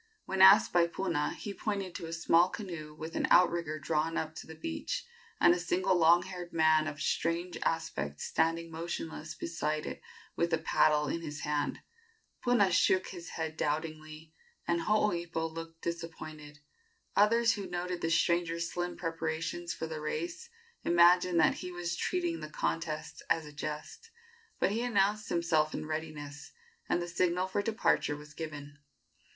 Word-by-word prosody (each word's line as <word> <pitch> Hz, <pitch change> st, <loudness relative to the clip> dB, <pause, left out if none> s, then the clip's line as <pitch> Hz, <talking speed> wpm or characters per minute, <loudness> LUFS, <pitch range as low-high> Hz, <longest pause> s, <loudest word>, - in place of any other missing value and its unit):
When 190 Hz, 0 st, -1 dB
asked 195 Hz, +2 st, +8 dB
by 175 Hz, -1 st, +5 dB
Puna, 170 Hz, -4 st, -1 dB
he 205 Hz, -, -6 dB
pointed 200 Hz, -4 st, -3 dB
to 165 Hz, -, -6 dB
a -, -, -7 dB
small 170 Hz, +1 st, +4 dB
canoe 170 Hz, -7 st, -7 dB
with 160 Hz, +2 st, -7 dB
an -, -, +1 dB
outrigger 170 Hz, -3 st, +4 dB
drawn 155 Hz, +2 st, -1 dB
up 155 Hz, -, -1 dB
on 160 Hz, -, -26 dB
the 160 Hz, -, -9 dB
beach, 80 Hz, -, -4 dB, 0.3 s
and 175 Hz, -, +7 dB
a 175 Hz, -, -1 dB
single 175 Hz, +2 st, +1 dB
long 170 Hz, +1 st, +5 dB
haired 180 Hz, -2 st, -7 dB
man 155 Hz, -1 st, +4 dB
of 145 Hz, -2 st, -5 dB
strange 170 Hz, +3 st, -1 dB
aspect 75 Hz, -, -2 dB
standing 165 Hz, +1 st, 0 dB
motionless 165 Hz, -1 st, -5 dB
beside 155 Hz, -2 st, -2 dB
it -, -, -6 dB, 0.3 s
with 170 Hz, 0 st, 0 dB
a -, -, +5 dB
paddle 150 Hz, -1 st, +3 dB
in 170 Hz, -, -2 dB
his 150 Hz, -3 st, -6 dB
hand. 150 Hz, -1 st, -1 dB, 0.6 s
Puna 240 Hz, -6 st, +4 dB
shook 185 Hz, +2 st, +3 dB
his 175 Hz, -2 st, -8 dB
head 160 Hz, -1 st, -4 dB
doubtingly, 155 Hz, +1 st, -4 dB, 0.3 s
and 170 Hz, 0 st, +1 dB
Hooipo 170 Hz, -5 st, +1 dB
looked 165 Hz, 0 st, -8 dB
disappointed. 155 Hz, -3 st, -6 dB, 0.6 s
Others 230 Hz, +2 st, +5 dB
who 200 Hz, -3 st, -5 dB
noted 180 Hz, 0 st, -3 dB
the 165 Hz, -, 0 dB
stranger's 170 Hz, 0 st, +1 dB
slim 175 Hz, 0 st, -3 dB
preparations 165 Hz, +1 st, -3 dB
for 160 Hz, -, -4 dB
the 160 Hz, -1 st, -5 dB
race 345 Hz, -, -4 dB, 0.3 s
imagined 175 Hz, 0 st, +5 dB
that 155 Hz, -, +5 dB
he 180 Hz, -, -6 dB
was 175 Hz, -1 st, -3 dB
treating 345 Hz, -, -1 dB
the 155 Hz, -, -7 dB
contest 155 Hz, 0 st, -3 dB
as 165 Hz, -1 st, +2 dB
a 150 Hz, -, -11 dB
jest; 150 Hz, -, -6 dB, 0.5 s
but -, -, +2 dB
he 225 Hz, +3 st, -1 dB
announced 210 Hz, -3 st, +1 dB
himself 160 Hz, -3 st, +1 dB
in -, -, -4 dB
readiness, 155 Hz, -2 st, -6 dB, 0.4 s
and -, -, +2 dB
the -, -, -5 dB
signal 180 Hz, +1 st, +1 dB
for 195 Hz, +2 st, -1 dB
departure 210 Hz, -8 st, +1 dB
was 150 Hz, +1 st, -12 dB
given. 145 Hz, -2 st, -7 dB
165 Hz, 160 wpm, -31 LUFS, 155-180 Hz, 0.6 s, asked